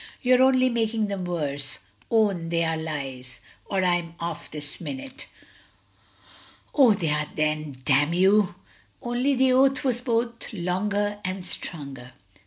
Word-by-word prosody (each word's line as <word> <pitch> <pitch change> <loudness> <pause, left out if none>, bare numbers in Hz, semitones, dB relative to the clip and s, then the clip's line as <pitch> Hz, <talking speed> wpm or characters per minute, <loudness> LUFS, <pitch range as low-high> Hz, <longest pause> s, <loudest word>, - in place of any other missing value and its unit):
"You're 255 0 +5
only 260 -1 +5
making 225 -3 0
them 195 -2 -3
worse; 145 -6 -2 0.3
own 200 -7 +2
they 170 0 +1
are 165 0 0
lies, 135 -6 -5 0.3
or 195 -1 0
I'm 175 -2 0
off 170 -2 -5
this 145 -1 -8
minute." 270 0 -7 1.5
"Oh, 255 -7 +6
they 165 -5 -1
are 150 0 0
then, 155 -3 -2
damn 145 +3 +4
you!" 190 +1 +4 0.4
Only 245 +3 0
the 260 0 +4
oath 270 +1 +4
was 245 -3 0
both 235 -1 -1
longer 205 +3 -1
and 185 0 -3
stronger. 140 -8 -7
185 Hz, 135 wpm, -25 LUFS, 155-235 Hz, 1.5 s, Oh